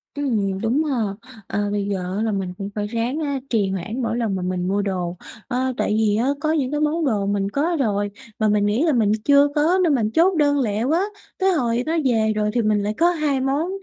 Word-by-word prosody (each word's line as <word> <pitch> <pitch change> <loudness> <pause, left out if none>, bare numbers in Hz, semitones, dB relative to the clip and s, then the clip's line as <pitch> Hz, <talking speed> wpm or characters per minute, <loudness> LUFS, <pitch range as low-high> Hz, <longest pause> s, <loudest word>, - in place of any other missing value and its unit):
Ừm, 215 -9 -1
đúng 245 +7 +1
ha! 285 -4 -1 0.5
À, 205 0 -1
bây 205 -1 -1
giờ 185 -2 -3
á 215 - 0
là 225 - 0
mình 190 -3 -3
cũng 200 0 -5
phải 205 -1 -2
ráng 235 +6 -2
á 285 -3 -2
trì 210 -5 +1
hoãn 195 +7 -4
mỗi 230 -1 -1
lần 225 -5 -1
mà 185 - -3
mình 180 0 -2
mua 200 +2 +1
đồ, 180 -3 -3 0.3
ờ, 260 0 -1
tại 210 - 0
vì 215 -2 +2
á 230 +4 +1
có 310 0 +1
những 280 -5 0
cái 295 - -1
món 305 +2 +1
đồ 210 -7 0
mình 200 -1 0
có 325 +7 0
rồi 205 -5 0 0.3
mà 215 - +2
mình 210 -1 +2
nghĩ 210 +7 +1
là 320 -3 +2
mình 220 -5 +2
chưa 285 0 +6
có 320 +5 +3
nên 320 -5 +3
mình 220 -4 0
chốt 355 +8 +3
đơn 285 -2 +3
lẹ 215 -4 0
quá, 315 +8 +2 0.4
tới 380 0 +3
hồi 240 -6 0
nó 325 +2 0
về 220 -4 +2
rồi 210 0 +1
thì 240 - +2
mình 210 -2 +1
lại 210 +1 -1
có 340 +1 +4
2 300 -5 0
món, 280 +6 0
230 Hz, 245 wpm, -22 LUFS, 205-285 Hz, 0.5 s, chưa